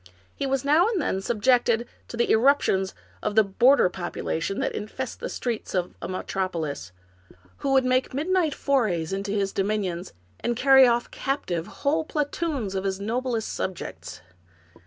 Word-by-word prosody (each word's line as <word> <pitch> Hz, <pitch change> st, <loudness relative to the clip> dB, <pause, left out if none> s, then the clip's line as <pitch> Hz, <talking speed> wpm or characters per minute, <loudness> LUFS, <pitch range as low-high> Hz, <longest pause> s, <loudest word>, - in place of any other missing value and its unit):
He 275 Hz, -, -2 dB
was 270 Hz, 0 st, -1 dB
now 310 Hz, +7 st, +5 dB
and 445 Hz, -5 st, 0 dB
then 190 Hz, -, -1 dB
subjected 235 Hz, +2 st, +2 dB, 0.2 s
to 235 Hz, -, -7 dB
the 235 Hz, -, +2 dB
eruptions 220 Hz, -6 st, +3 dB, 0.3 s
of 205 Hz, -, -2 dB
the 220 Hz, -, +7 dB
border 235 Hz, +6 st, +4 dB
population 175 Hz, +1 st, -3 dB
that -, -, 0 dB
infest 240 Hz, +4 st, -5 dB
the -, -, -4 dB
streets 235 Hz, -5 st, -3 dB
of 180 Hz, -1 st, -1 dB
a -, -, -4 dB
metropo 185 Hz, -1 st, -2 dB
lis, 140 Hz, -, -5 dB, 0.7 s
who 275 Hz, -, -2 dB
would 265 Hz, -1 st, +4 dB
make 255 Hz, 0 st, +1 dB
midnight 320 Hz, +3 st, +1 dB
forays 200 Hz, -, 0 dB
into 195 Hz, +1 st, -3 dB
his 200 Hz, -1 st, 0 dB
dominions, 195 Hz, -3 st, -2 dB, 0.3 s
and 240 Hz, -, -1 dB
carry 265 Hz, +1 st, +7 dB
off 240 Hz, 0 st, +1 dB
captive 185 Hz, -, -2 dB
whole 310 Hz, +3 st, 0 dB
platoons 295 Hz, -, -2 dB
of 190 Hz, -1 st, -2 dB
his 190 Hz, -1 st, -2 dB
noblest 230 Hz, +2 st, -2 dB
subjects. 185 Hz, -2 st, -5 dB
230 Hz, 155 wpm, -25 LUFS, 190-270 Hz, 0.7 s, the